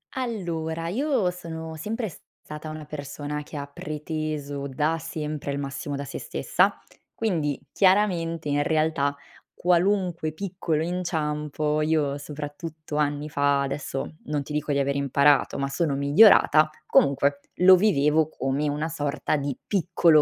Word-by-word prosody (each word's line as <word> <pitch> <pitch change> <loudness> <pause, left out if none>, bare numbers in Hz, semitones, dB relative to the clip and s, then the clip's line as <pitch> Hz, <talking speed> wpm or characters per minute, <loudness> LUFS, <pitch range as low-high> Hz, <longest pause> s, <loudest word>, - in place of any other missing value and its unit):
Allora, 170 -10 -3
io 245 - +1
sono 160 -2 -7
sempre 220 +8 -3 0.4
stata 150 +1 -7
una 155 0 -7
persona, 145 0 -5
che 150 - -9
ha 140 - -4
preteso 150 -1 -4
da 150 +4 0
sempre 150 -3 -4
il 140 - -2
massimo 140 +1 -4
da 140 0 -4
sé - - -6
stessa. - - +1 0.4
Quindi, 160 -10 -1
chiaramente, 180 -5 +2
in 145 0 +2
realtà, 155 -3 +1 0.4
qualunque 180 -2 +1
piccolo 170 -3 -2
inciampo 150 -3 -1
io- 150 -2 +1
soprattutto 150 +2 -6
anni 145 0 0
fa, 145 -2 +2
adesso 140 +2 -4
non 150 -1 -2
ti 150 - -8
dico 150 0 -1
di 140 - +1
aver 140 0 0
imparato, 140 +1 +3
ma 140 0 -1
sono 140 +1 0
migliorata- 155 +1 +6 0.2
comunque, 140 +1 +3 0.2
lo 185 +1 +8
vivevo 160 -6 +3
come 140 0 -1
una 150 +3 -2
sorta 150 -1 -1
di 140 -2 -2
piccolo 170 -5 +4
150 Hz, 135 wpm, -25 LUFS, 145-165 Hz, 0.4 s, lo